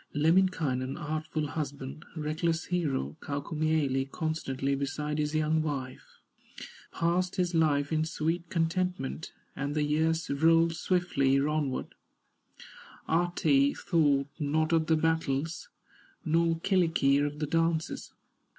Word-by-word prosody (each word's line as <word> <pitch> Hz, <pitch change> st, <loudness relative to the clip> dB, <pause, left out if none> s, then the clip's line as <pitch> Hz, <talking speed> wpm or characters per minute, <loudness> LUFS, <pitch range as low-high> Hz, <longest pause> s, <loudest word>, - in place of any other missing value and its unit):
Lemminkainen, 155 Hz, -5 st, +2 dB
artful 155 Hz, -1 st, -3 dB
husband, 145 Hz, 0 st, -5 dB
Reckless 160 Hz, +2 st, -1 dB
hero, 145 Hz, -, -1 dB
Kaukomieli, 145 Hz, -2 st, -1 dB
Constantly 140 Hz, -4 st, -2 dB
beside 150 Hz, +2 st, -2 dB
his 150 Hz, +1 st, -1 dB
young 155 Hz, +1 st, +2 dB
wife, 135 Hz, -4 st, -5 dB, 0.7 s
Passed 175 Hz, +2 st, 0 dB
his 180 Hz, -2 st, 0 dB
life 145 Hz, -3 st, +2 dB
in 155 Hz, 0 st, +2 dB
sweet 165 Hz, +2 st, -2 dB
contentment, 165 Hz, -3 st, -1 dB, 0.2 s
And 140 Hz, +2 st, -3 dB
the 150 Hz, -, +2 dB
years 160 Hz, +2 st, +1 dB
rolled 165 Hz, +3 st, +4 dB
swiftly 150 Hz, -8 st, +1 dB
onward; 145 Hz, -2 st, -1 dB, 1.1 s
Ahti 160 Hz, -4 st, +2 dB
thought 145 Hz, -4 st, +2 dB
not 155 Hz, +2 st, +1 dB
of 160 Hz, -1 st, +2 dB
the 160 Hz, -, +3 dB
battles, 160 Hz, -1 st, -1 dB, 0.6 s
Nor 165 Hz, +1 st, +2 dB
Kyllikki 165 Hz, -8 st, +3 dB
of 145 Hz, 0 st, -1 dB
the 150 Hz, -, -1 dB
dances. 165 Hz, +1 st, -1 dB
155 Hz, 110 wpm, -29 LUFS, 145-165 Hz, 1.1 s, rolled